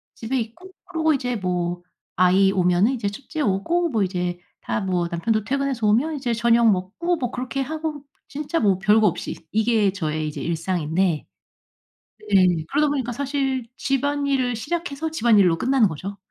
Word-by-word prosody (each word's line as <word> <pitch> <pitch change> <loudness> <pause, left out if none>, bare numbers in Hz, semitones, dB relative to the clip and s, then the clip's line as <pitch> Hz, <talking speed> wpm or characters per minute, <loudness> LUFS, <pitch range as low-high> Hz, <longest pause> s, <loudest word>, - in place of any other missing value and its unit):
집에 245 +3 -2
있고 340 +12 -7
그러고 320 -4 +1
이제 250 -3 -1
뭐 175 -2 -2 0.3
아이 190 +2 +4
오면은 180 +6 +3
이제 210 -5 -2
첫째 275 +9 -6
오고 310 - +1
뭐 220 -6 +1
이제 180 -1 -2 0.2
다 - - -2
뭐 180 -2 0
남편도 215 +5 0
퇴근해서 270 -1 -1
오면 280 +9 +2
이제 250 -4 -2
저녁 235 -1 +4
먹고 220 - -1
뭐 245 -4 -2
그렇게 255 +2 -4
하고 305 0 -4 0.3
진짜 300 +3 -2
뭐 195 -3 +2
별거 210 +2 +4
없이 - - -3 0.2
이게 220 -2 +2
저의 155 -5 -2
이제 - - -7
일상인데 170 0 -1 1.1
네. 185 -2 +6 0.2
그러다 295 +1 +2
보니까 260 -4 -1
사실 270 -2 -2
집안일을 275 -3 0
시작해서 320 +4 -3
집안일로 210 - +4
끝나는 255 -1 +3
거죠. 195 +6 -6
230 Hz, 330 characters per minute, -23 LUFS, 190-275 Hz, 1.1 s, 네